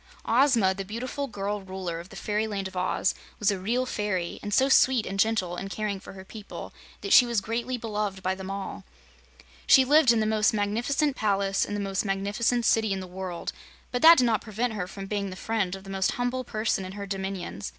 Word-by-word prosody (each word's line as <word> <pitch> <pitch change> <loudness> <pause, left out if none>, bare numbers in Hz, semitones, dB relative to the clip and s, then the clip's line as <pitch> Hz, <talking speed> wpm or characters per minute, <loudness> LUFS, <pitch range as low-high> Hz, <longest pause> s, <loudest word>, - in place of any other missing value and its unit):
Ozma, 235 -6 +4
the 195 +1 -5
beautiful 250 +7 -4
girl 205 -2 -3
Ruler 185 -3 -5
of 170 +2 -10
the - - -12
Fairyland 210 -2 -2
of 190 - -12
Oz, 180 +1 0 0.2
was 210 0 +2
a 195 - -3
real 240 +7 0
fairy, 205 -7 -2
and 205 - -5
so 260 +6 +4
sweet 260 -3 +4
and 195 +1 -4
gentle 195 -5 +1
in 195 - -5
caring 205 -1 -3
for - - -11
her 190 0 -11
people 210 +1 -9 0.3
that - - 0
she - - +9
was 235 -3 0
greatly 235 +5 -3
beloved 210 -4 -3
by 185 - +1
them 190 0 -7
all. 195 0 -5 0.8
She 265 -2 +7
lived 290 -2 +6
in 230 - +2
the 215 - +1
most 215 0 +2
magnificent 240 +8 0
palace 195 -3 +1
in 205 - -4
the - - -2
most 195 -1 -1
magnificent 210 +4 0
city 220 -2 +3
in 190 - -3
the 185 - -6
world, 180 -1 -5 0.4
but 245 - -1
that 330 +1 +9
did - - +4
not 225 -3 +2
prevent 225 +2 -2
her 190 -4 -3
from 195 +1 -8
being 200 0 -2
the 185 - -7
friend 200 -2 -1
of 190 - -11
the 195 - -9
most 190 0 0
humble 245 +1 -2
person 215 -4 -1
in 185 0 -7
her 200 0 -6
dominions. 190 - -4
205 Hz, 220 wpm, -27 LUFS, 190-230 Hz, 0.8 s, she